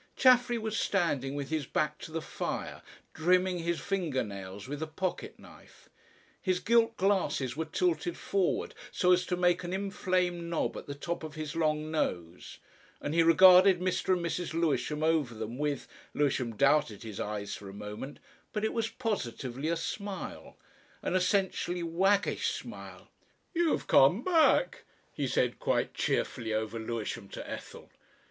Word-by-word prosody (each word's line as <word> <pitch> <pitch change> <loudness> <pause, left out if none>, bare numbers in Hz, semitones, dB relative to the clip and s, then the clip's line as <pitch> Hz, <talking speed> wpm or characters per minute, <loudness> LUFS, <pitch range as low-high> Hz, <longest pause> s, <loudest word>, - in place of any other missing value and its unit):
Chaffery 245 -2 +5
was 220 -2 -2
standing 145 -8 0
with 140 +1 -4
his 155 -4 -1
back 150 0 -1
to 160 - -9
the 160 0 -3
fire, - - -4 0.3
trimming 180 +2 +2
his 170 0 -1
finger 175 -9 -1
nails 100 -1 -8
with 145 +2 -5
a 160 - -2
pocket 175 +4 -4
knife. - - -17 0.5
His 185 -2 +1
gilt 230 +2 +3
glasses 185 -10 +1
were 160 +2 -2
tilted 170 0 0
forward 195 -3 0 0.2
so 180 - +2
as 180 0 +3
to 180 - -1
make 175 0 +2
an 175 +1 -4
inflamed 185 -3 -1
knob 170 - -1
at - - -8
the 140 - -5
top 170 +4 -4
of 155 0 -7
his 155 -2 -5
long 155 -1 0
nose, 90 - -3 0.4
and 145 - -3
he 170 - +4
regarded 185 +2 +7
Mr. 185 +1 +1
and 170 - -3
Mrs. 170 -1 -2
Lewisham 155 -1 0
over 155 -7 +1
them 110 +4 -5
with 145 -3 -1 0.3
Lewisham 130 -5 0
doubted 140 -5 +2
his 110 -3 -7
eyes 105 -1 -3
for 100 - -9
a - - -8
moment 105 +7 -7 0.4
but 210 0 -1
it - - -1
was 225 -1 -1
positively 140 - -3
a 170 +1 +1
smile, 200 +4 -6 0.5
an - - -1
essentially 185 -2 +1
waggish 195 +5 +2
smile. - - -8 0.4
"You've 340 -2 +1
come 175 - +5
back," 345 +7 +3 0.3
he - - -2
said - - 0
quite - - 0
cheerfully 115 -4 -1
over 110 +1 -2
Lewisham 110 -3 -4
to - - -7
Ethel. - - -8
165 Hz, 160 wpm, -30 LUFS, 135-185 Hz, 0.5 s, regarded